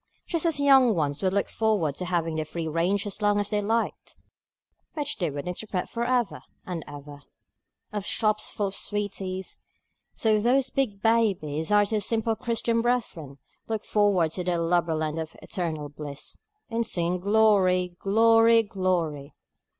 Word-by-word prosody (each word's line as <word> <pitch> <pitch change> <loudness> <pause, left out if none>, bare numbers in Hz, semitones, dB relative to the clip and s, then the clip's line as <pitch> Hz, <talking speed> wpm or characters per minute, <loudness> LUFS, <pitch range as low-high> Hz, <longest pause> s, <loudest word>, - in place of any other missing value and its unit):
Just 335 0 -1
as 320 -3 0
young 265 -5 +5
ones 145 -3 -1
would 190 -1 +1
look 200 +1 0
forward 210 -10 0
to 180 - -3
having 170 -2 -1
the 155 0 -1
free 165 +1 -5
range 175 +6 0
as 205 +1 -6
long 205 0 +3
as 205 +1 -2
they 210 -1 +1
liked 225 +3 -2 0.8
(which 295 -2 -2
they 175 - -1
would 145 +3 -6
interpret 180 +1 -3
for 235 - -3
ever 245 -3 0 0.2
and 175 -4 -5
ever) 145 0 -10 0.7
of 205 -2 -2
shops 215 +1 0
full 205 - -2
of 195 0 -3
sweeties, 195 -3 -3 0.5
so 215 -1 +2
those 255 +4 +2
big 215 -8 -1
babies, 195 -9 +1
our 205 0 +5
dear 210 +1 -1
simple 225 +1 0
Christian 230 0 0
brethren, 220 - -2 0.3
look 220 -2 -3
forward 200 -6 +2
to 180 +2 -3
their 175 -1 0
Lubberland 165 -2 0
of 160 0 -8
eternal 160 -6 -4
bliss, 145 -1 -8 0.3
in 230 0 -1
singing 175 -4 -1
Glory! 190 -3 +3
Glory! 225 +2 +5
Glory! 175 -8 -2
200 Hz, 160 wpm, -26 LUFS, 165-225 Hz, 0.8 s, young